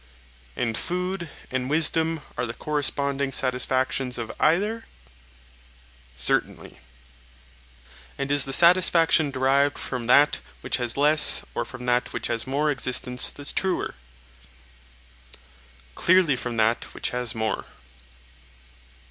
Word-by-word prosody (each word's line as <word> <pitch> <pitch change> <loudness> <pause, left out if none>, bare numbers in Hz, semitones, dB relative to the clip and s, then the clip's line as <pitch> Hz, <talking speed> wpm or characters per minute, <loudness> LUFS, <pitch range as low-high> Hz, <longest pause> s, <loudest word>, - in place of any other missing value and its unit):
And 115 -2 -2
food 180 -1 -3 0.2
and 130 0 -2
wisdom 160 +1 +2
are 120 0 -2
the 115 - -6
corresponding 140 -2 -1
satisfactions 130 0 -1
of 115 -2 -5
either? 205 +8 +1 1.3
Certainly. - - -1 1.4
And 140 0 -3
is 145 -1 +5
the 135 - -3
satisfaction 170 -1 +4
derived 140 +2 +1
from 125 -3 -5
that 145 +2 +4 0.2
which - - -1
has 120 -1 -2
less 150 +1 +4
or - - -3
from 125 - -9
that 125 0 0
which - - -3
has 115 +2 -3
more 145 +3 0
existence 125 -2 0
the 145 - -11
truer? 190 +5 -2 2.0
Clearly, 175 - +3
from 120 -1 -5
that 115 +1 0
which - - -3
has 125 -1 -3
more. 110 -2 -2
140 Hz, 115 wpm, -24 LUFS, 125-155 Hz, 2.0 s, is